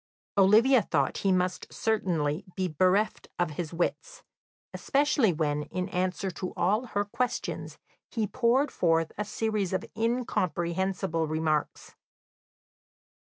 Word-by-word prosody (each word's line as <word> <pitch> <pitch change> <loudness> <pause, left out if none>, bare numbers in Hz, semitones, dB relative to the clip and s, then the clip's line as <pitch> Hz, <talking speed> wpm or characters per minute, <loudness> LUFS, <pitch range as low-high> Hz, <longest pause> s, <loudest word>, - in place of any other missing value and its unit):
Olivia 220 +6 +6
thought 140 -8 0
he 195 - +2
must 180 0 0
certainly 175 -7 0
be 185 -1 0
bereft 185 +6 +1
of 175 -2 0
his 155 +1 -4
wits, - - -3 0.5
especially 280 -6 +2
when, 150 -2 -1
in 185 +1 -4
answer 185 +1 -1
to 180 +1 -6
all 210 +7 +1
her 205 -2 -1
questions, 245 +4 -3 0.3
he 225 -3 -1
poured 250 +7 +2
forth 165 -2 +1
a 210 - -2
series 210 -3 -2
of 185 - -1
incomprehensible 185 -7 -1
remarks. 155 -1 -1
185 Hz, 115 wpm, -28 LUFS, 170-220 Hz, 0.5 s, Olivia